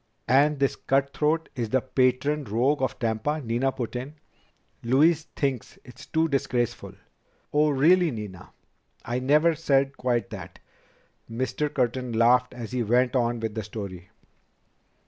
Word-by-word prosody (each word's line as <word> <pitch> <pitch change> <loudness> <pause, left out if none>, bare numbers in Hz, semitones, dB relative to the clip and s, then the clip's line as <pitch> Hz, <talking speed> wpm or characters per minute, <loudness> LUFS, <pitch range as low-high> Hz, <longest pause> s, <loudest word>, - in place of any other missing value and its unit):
"And 145 +3 +4
this 140 0 +1
cutthroat 145 +4 0
is 115 -3 -3
the 130 - +2
patron 130 +3 +1
rogue 125 +7 +1
of 130 - -1
Tampa," 115 +7 -1
Nina 125 +1 0
put 125 -2 -5
in. 130 +5 -5 0.7
"Louise 150 +6 +3
thinks 135 -5 -2
it's 125 -1 -13
too 160 0 +1
disgraceful." 125 -5 -2 0.6
"Oh, 150 +1 +3
really, 165 +5 +4
Nina. 105 - -7 0.6
I 120 +1 -2
never 150 +6 +3
said 140 -3 +1
quite 120 -1 -1
that 100 -6 -9 0.4
" - - -38
Mr. 130 +5 -2
Curtin 125 -2 -1
laughed 120 +2 +3
as 120 -2 -7
he 125 -1 -1
went 125 +3 +2
on 120 -2 0
with 110 -1 -3
the 110 - -3
story. 100 -4 -8
130 Hz, 145 wpm, -26 LUFS, 115-145 Hz, 0.7 s, And